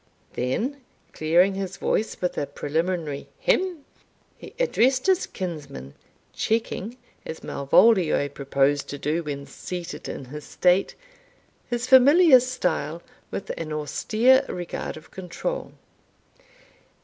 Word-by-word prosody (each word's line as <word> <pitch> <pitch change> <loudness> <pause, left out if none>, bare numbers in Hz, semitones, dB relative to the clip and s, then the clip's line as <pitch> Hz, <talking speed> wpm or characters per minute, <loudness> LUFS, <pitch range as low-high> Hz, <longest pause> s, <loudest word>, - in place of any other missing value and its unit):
Then, 235 - -2 0.3
clearing 175 +5 +3
his 195 -1 -4
voice 220 - -1
with 180 - -1
a 145 - -2
preliminary 160 -2 -2
hem, 360 -6 0 0.5
he - - -12
addressed 260 - +2
his 380 -1 +2
kinsman, 145 - -6 0.4
checking, 225 0 -2 0.3
as 160 - -8
Malvolio 160 +1 +3
proposed 140 0 0
to 145 - -5
do 150 +4 -1
when 140 -3 -5
seated 175 +2 -7
in 135 - -6
his 150 +4 -8
state, 180 +5 +2 0.7
his 240 0 -1
familiar 270 +3 +7
smile 180 - -2 0.3
with - - -5
an 160 -2 -5
austere 220 - +2
regard 175 -2 -5
of 155 0 -15
control. 190 - -5
180 Hz, 115 wpm, -25 LUFS, 150-245 Hz, 0.7 s, familiar